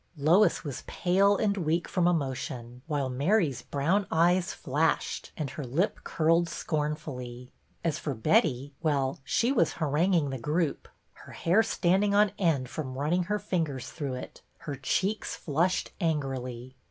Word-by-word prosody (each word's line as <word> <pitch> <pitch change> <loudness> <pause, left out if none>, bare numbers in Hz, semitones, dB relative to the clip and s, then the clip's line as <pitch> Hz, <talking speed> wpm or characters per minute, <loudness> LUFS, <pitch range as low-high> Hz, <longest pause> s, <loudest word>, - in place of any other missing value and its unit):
Lois 170 +9 +4
was 140 -6 -5
pale 195 +3 +3
and 205 -2 +1
weak 170 -1 0
from 175 -2 +1
emotion, 130 -6 -2
while 145 -4 0
Mary's 140 - +1
brown 170 +11 0
eyes 175 +2 +3
flashed 150 +4 -1
and 145 -5 -3
her 150 - -6
lip 145 - 0
curled 165 +1 +2
scornfully. 150 -7 -4 0.3
As 160 -2 0
for 145 -4 -3
Betty, 140 +2 +2
well, 140 -4 0
she 235 - +1
was 275 - +2
haranguing 160 0 +1
the 135 - -4
group, 155 +6 -1 0.3
her - - -14
hair 180 +6 +3
standing 200 0 +2
on 205 -1 +5
end 155 -9 +2
from 130 -2 -5
running 170 +6 +1
her 210 +3 0
fingers 165 -10 -2
through 140 -5 -4
it, 125 - -9 0.2
her 145 - -6
cheeks 190 +10 -1
flushed 170 +5 0
angrily. 130 -6 -2
155 Hz, 145 wpm, -28 LUFS, 135-180 Hz, 0.3 s, on